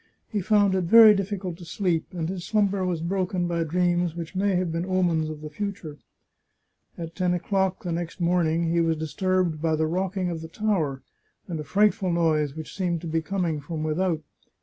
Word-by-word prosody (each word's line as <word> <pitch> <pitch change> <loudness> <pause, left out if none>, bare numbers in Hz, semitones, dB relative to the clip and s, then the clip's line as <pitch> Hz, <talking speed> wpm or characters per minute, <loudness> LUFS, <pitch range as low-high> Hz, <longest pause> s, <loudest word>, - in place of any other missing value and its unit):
He 210 -3 -1
found 205 0 +3
it 185 -2 +1
very 220 +3 +9
difficult 195 -3 -3
to - - -9
sleep, 170 -1 -1
and 170 -3 -3
his 180 0 -4
slumber 200 -1 +1
was 175 -3 -1
broken 180 0 -1
by 170 -1 0
dreams 175 +1 +1
which 170 0 -6
may 195 0 +1
have 180 -2 0
been 165 +1 -2
omens 175 -4 +1
of 155 -1 -7
the 155 - -6
future. 185 -5 -5 1.0
At 165 -1 -6
ten 180 -1 0
o'clock 190 +2 -1
next 170 0 -3
morn 175 -1 +2
ing, 165 +2 +1
he 170 0 +2
was 165 -1 +1
disturbed 175 0 0
by 160 -1 +1
the 160 0 +1
rocking 185 +2 -1
of 165 -1 -5
the 160 - -7
tower, 160 - -1 0.4
and 170 -4 -4
a - - -4
frightful 195 +2 +2
noise 155 -4 +1
which 160 -1 -8
seemed 180 -3 -1
to 170 - -6
be 165 0 0
coming 170 -3 -2
from 155 +1 -5
without. 160 +1 0
175 Hz, 195 wpm, -25 LUFS, 160-190 Hz, 1.0 s, very